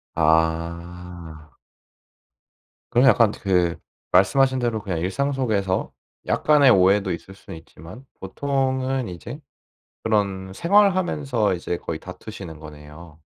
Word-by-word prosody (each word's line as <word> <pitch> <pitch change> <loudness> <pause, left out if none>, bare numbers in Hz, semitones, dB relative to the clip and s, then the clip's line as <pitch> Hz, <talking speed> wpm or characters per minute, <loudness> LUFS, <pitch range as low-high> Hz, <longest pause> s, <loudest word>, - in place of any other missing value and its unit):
아. 85 0 -2 1.4
그럼 125 +3 +4
약간 115 -3 +5
그 90 -5 0 0.3
말씀 95 +9 +4
하신 130 -1 +3
대로 115 -3 -1
그냥 95 -5 -3
일상 120 +12 -1
속에서 105 -8 -1 0.3
약간의 145 -3 +4
오해도 95 0 +3
있을 95 +3 -8
수는 85 -4 -11
있지만 80 - -14 0.2
보통은 130 -3 -1
이제 90 - -8 0.6
그런 100 -3 -1
생활하면서 170 - +2
이제 90 0 -3
거의 80 -2 -5
다투시는 90 -3 -9
거네요. 75 +1 -13
95 Hz, 245 characters per minute, -23 LUFS, 85-130 Hz, 1.4 s, 약간